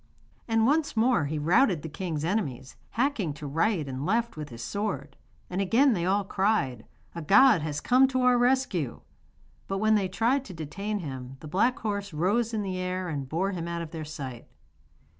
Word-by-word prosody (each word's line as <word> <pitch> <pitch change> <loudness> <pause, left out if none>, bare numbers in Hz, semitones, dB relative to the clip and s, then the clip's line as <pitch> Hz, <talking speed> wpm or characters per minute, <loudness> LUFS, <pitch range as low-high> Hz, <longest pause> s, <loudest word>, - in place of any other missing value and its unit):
And 225 -1 +2
once 290 -1 +1
more 230 - +3
he 155 +2 -2
routed 175 - +3
the - - -4
king's 160 -1 -4
enemies, 140 - -2 0.2
hacking 230 - 0
to 150 - -8
right 160 +3 0
and 130 0 -4
left 230 +7 0
with 150 -1 -6
his 115 -1 -8
sword. 145 - -3 0.3
And 180 +2 -2
again 240 +7 +4
they 175 -3 -1
all 200 +2 +2
cried: 190 - 0 0.3
'A 170 - -5
god 205 - +6
has 150 -1 -3
come 255 - +4
to 260 -1 0
our 250 0 +5
rescue!' 245 - +1 0.7
But 195 - -2
when 215 +2 +3
they 200 -3 +2
tried 235 +8 +1
to 185 - -9
detain 200 +7 -4
him 130 -3 -7
the 155 - -9
black 230 +11 +2
horse 200 -3 -3
rose 205 +9 +1
in 215 -2 -2
the 185 -2 -3
air 185 0 -2
and 140 -4 -4
bore 185 +6 0
him 170 -3 -4
out 170 0 -3
of 160 - -9
their 160 -2 -5
sight. 135 -6 -7
185 Hz, 195 wpm, -27 LUFS, 150-220 Hz, 0.7 s, god